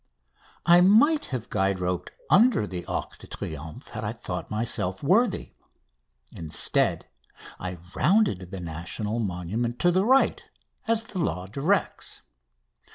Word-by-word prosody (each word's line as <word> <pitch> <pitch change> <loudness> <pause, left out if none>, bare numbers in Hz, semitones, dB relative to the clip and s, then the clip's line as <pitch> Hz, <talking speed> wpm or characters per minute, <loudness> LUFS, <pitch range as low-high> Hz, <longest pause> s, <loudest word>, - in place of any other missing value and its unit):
I 175 +1 +7
might 235 - +5
have 125 -4 -5
guide 95 -1 +1
roped 90 -1 -2 0.2
under 225 - +5
the 90 -3 -5
Arc - - -4
de - - -13
Triomphe 80 0 -7
had - - -6
I - - -2
thought - - -6
myself 105 -3 -2
worthy. 195 - +2 0.8
Instead, 80 -2 0 0.5
I 90 -1 -5 0.2
rounded 180 - +2
the 95 0 -6
national 85 +7 -4
monument 105 +5 -2
to 175 - +4
the 185 +2 +2
right, 265 +5 +3 0.4
as 225 0 +2
the 205 -4 -6
law 90 - -1
directs. 145 - -1
115 Hz, 130 wpm, -26 LUFS, -, 0.8 s, I